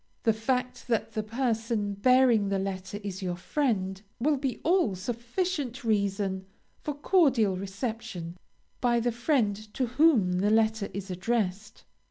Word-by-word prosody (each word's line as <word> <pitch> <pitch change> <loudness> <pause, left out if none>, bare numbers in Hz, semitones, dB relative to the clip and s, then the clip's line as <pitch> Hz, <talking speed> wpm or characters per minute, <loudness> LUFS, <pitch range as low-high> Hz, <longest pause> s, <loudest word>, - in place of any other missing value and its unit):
The 225 - +4
fact 250 +4 -2
that 230 -3 0
the 215 - -2
person 225 -2 -1
bearing 240 -1 +4
the 195 - +1
letter 190 0 -4
is 195 -1 -5
your 180 -2 -2
friend, 190 -3 -1 0.2
will 295 +5 +2
be 265 -2 -2
all 340 - +3
sufficient 245 - -3
reason 200 -3 0 0.3
for 295 - -3
cordial 275 - +3
reception 195 -3 -5 0.4
by 240 -1 +2
the 240 +1 +1
friend 235 -3 +1 0.2
to 260 - +1
whom 240 - +3
the 205 +2 +2
letter 220 -1 +2
is 195 -1 -6
addressed. 210 +2 -2
220 Hz, 140 wpm, -28 LUFS, 195-250 Hz, 0.4 s, The